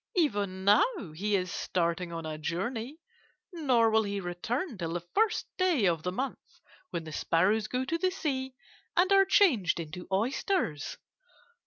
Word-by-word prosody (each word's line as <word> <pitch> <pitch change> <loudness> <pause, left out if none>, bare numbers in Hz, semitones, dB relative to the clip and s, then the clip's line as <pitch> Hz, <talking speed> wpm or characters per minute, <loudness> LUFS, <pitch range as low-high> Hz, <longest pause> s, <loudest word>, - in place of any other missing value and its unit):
'Even 200 - 0
now 210 - +3
he 205 +6 0
is 180 -2 -1
starting 170 0 -1
on 165 -1 -5
a 155 -1 -4
journey, 220 - -3 0.6
nor 255 -9 +3
will 220 0 +4
he 200 -1 -2
return 225 - -3
till 165 -4 -4
the 175 - -1
first 440 +1 +2
day 350 - +3
of 170 -3 +2
the 180 - -2
month 260 +8 -3 0.5
when 170 - -4
the 160 - -8
sparrows 200 +8 +2
go 255 +1 -2
to 330 +5 -1
the 370 - +2
sea 265 -8 -3 0.4
and 365 +2 +4
are 390 0 +6
changed 255 - +3
into 170 +2 -7
oysters. 215 - -1
210 Hz, 160 wpm, -29 LUFS, 175-280 Hz, 0.6 s, are